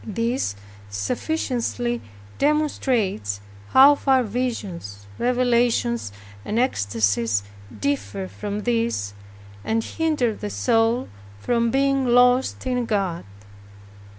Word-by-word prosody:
This 230 - -1 0.3
sufficiently 240 - -2 0.4
demonstrates 245 - 0 0.3
how 275 - +8
far 270 -2 +2
visions, 200 - -4
revelations 240 - +1 0.3
and 215 - -3
ecstasies, 105 - +1 0.4
differ 100 -7 -2
from 200 - -5
this, 230 - -1 0.5
and 225 0 0
hinder 300 -8 0
the 105 - -6
soul 225 - +1 0.3
from 235 - +1
being 275 +1 +2
lost 245 +2 +3
in 250 -1 0
God. 195 -6 -1
230 Hz, 90 wpm, -23 LUFS, -, 0.5 s, how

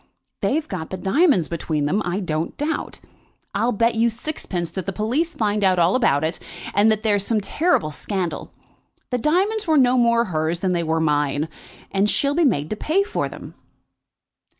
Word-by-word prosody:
They've 300 +3 0
got 180 -5 -5
the 190 - -4
diamonds 195 - +3
between 155 -3 -2
them, 190 +9 +1
I 180 +3 -2
don't 160 -2 -3
doubt. 300 +2 -3 0.5
I'll 240 - +1
bet 230 +2 +2
you 230 +1 +2
sixpence 220 - -4
that 190 -3 -5
the - - 0
police 250 - -1
find 210 -2 0
out 185 -1 +4
all 175 +2 +3
about 150 - +2
it, 160 +1 -2 0.3
and 210 +2 +4
that 215 0 -1
there 210 -2 +3
is 200 - -1
some 220 +1 +1
terrible 210 - +1
scandal. 185 +3 -4 0.6
The 250 - 0
diamonds 380 - +1
were 315 -1 +4
no 255 -1 +4
more 235 0 +3
hers 160 -1 -1
than 185 -1 +1
they 170 - 0
were 160 0 0
mine, 150 -1 +1 0.4
and 200 +1 +2
she'll 280 +5 +2
be 335 +2 +3
made 150 - +1
to - - 0
pay 330 - +1
for 405 - -2
them." - - -10
205 Hz, 190 wpm, -22 LUFS, 170-255 Hz, 0.6 s, out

